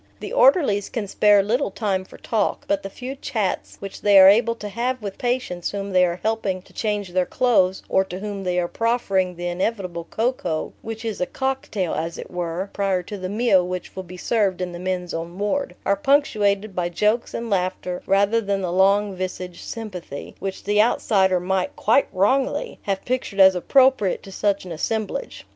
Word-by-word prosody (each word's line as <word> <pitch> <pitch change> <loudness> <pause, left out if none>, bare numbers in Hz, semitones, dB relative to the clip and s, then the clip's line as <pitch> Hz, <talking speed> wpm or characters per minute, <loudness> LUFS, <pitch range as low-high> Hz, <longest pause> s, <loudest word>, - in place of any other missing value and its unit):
The - - -6
orderlies 355 - +4
can 220 -4 -3
spare 205 0 +4
little 240 +6 0
time 195 -2 -2
for - - -14
talk, 220 -3 -1
but 200 0 +1
the 195 - -6
few 255 +6 -7
chats 225 -8 -3
which 195 -1 -8
they 205 -1 +5
are 190 0 +10
able 230 +3 +3
to 210 - -7
have 240 +5 -2
with 200 -3 -7
patients 245 -8 -1
whom 200 0 -4
they 185 -1 +4
are 175 0 0
helping 205 -4 -1
to - - -21
change 210 -3 -2
their 180 0 0
clothes, 190 -7 +2
or 190 - +3
to 180 -1 -7
whom 200 0 -5
they 180 -1 -1
are 175 - 0
proffering 195 -5 0
the 175 +1 -6
inevitable 180 -2 -2
cocoa 220 -8 -2
(which 225 0 -7
is 220 -4 -3
a 180 - +1
cocktail, 260 -9 -2
as 165 +2 -3
it - - -8
were, 175 +2 -3
prior 195 -3 0
to 205 - -7
the 185 -2 -5
meal 205 -3 +3
which 180 0 -5
will 190 - -4
be 180 0 -11
served 195 -2 0
in 180 -1 -3
the 175 - -7
men's 180 -1 -3
own 170 +2 -5
ward), 210 +8 -1
are - - +3
punctuated 215 -9 +1
by 175 -1 -1
jokes 210 +7 0
and 230 -1 -4
laughter 180 -1 -1
rather 200 +4 +3
than 200 -2 -1
the 180 -2 -2
long 195 +2 +3
visaged 185 -1 -5
"sympathy" 185 -10 -7
which 195 -1 -5
the 205 +1 +3
outsider 190 -5 +2
might 185 +1 -1
quite 230 +6 +3
wrongly! 260 - 0
have 195 -1 -3
pictured 245 -5 -2
as 190 0 +8
appropriate 255 +1 +3
to 195 - -11
such 200 0 0
an 180 - -8
assemblage. 220 - -3
195 Hz, 195 wpm, -23 LUFS, 185-225 Hz, -, are